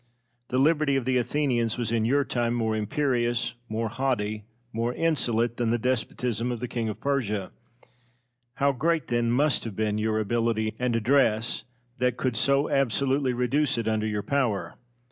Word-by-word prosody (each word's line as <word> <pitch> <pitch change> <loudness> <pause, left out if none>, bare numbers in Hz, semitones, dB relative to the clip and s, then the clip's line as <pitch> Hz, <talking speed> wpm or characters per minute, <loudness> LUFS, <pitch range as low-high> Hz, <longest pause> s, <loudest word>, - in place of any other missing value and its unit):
The 125 - -1
liberty 150 0 +3
of 135 -3 0
the 130 0 +2
Athenians 120 -4 0
was 120 -2 -1
in 115 -2 +1
your 140 +4 +2
time 120 -1 0
more 110 -2 0
imperious, 120 0 0 0.2
more 110 +1 -1
haughty, 110 -4 -2 0.3
more 115 +2 -1
insolent, 120 -8 +1
than 120 -2 0
the 120 - +2
despotism 120 0 -1
of 120 - -3
the 125 - -3
King 115 -2 -2
of 105 - -6
Persia. 105 -9 -1 1.0
How 140 0 +2
great, 160 +5 0
then, 120 -1 +1
must 140 +4 +2
have 110 -4 -6
been 105 0 0
your 110 0 0
ability 110 0 0
and 125 -1 0
address 115 -1 +2 0.3
that 125 -1 +1
could 125 -2 -1
so 140 +5 +3
absolutely 135 0 +1
reduce 130 +3 +1
it 115 -1 -2
under 110 -1 0
your 105 -1 -2
power! 125 -4 0
120 Hz, 165 wpm, -26 LUFS, 110-135 Hz, 1.0 s, liberty